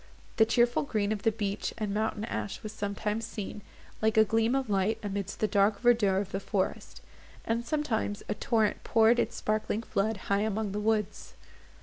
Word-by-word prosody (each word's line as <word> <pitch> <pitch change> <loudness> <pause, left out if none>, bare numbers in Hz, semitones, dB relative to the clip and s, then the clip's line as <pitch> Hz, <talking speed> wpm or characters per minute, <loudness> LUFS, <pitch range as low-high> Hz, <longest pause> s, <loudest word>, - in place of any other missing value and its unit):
The 220 - +5
cheerful 240 +1 +3
green 215 -7 -1
of 215 -2 -2
the 225 - +3
beech 205 -2 -3
and 210 -3 -2
mountain 215 0 -1
ash 210 - -4
was 215 - -5
sometimes 210 +2 -3
seen, 210 -2 -6 0.4
like 220 0 +2
a 220 - +8
gleam 225 +4 +2
of 270 -2 0
light, 205 +2 +1
amidst 200 -1 -4
the 215 - +3
dark 200 +1 +2
verdure 230 -6 +3
of 195 -1 -4
the 195 - -2
forest; 195 -1 -3 0.4
and 230 +1 0
sometimes 235 -7 -1
a - - 0
torrent 220 0 0
poured 230 +1 +4
its - - 0
sparkling 215 +1 -1
flood, 215 0 -1
high 200 0 +2
among 215 -1 -1
the 205 - -2
woods. 210 -1 -1
215 Hz, 185 wpm, -29 LUFS, 205-225 Hz, 0.4 s, a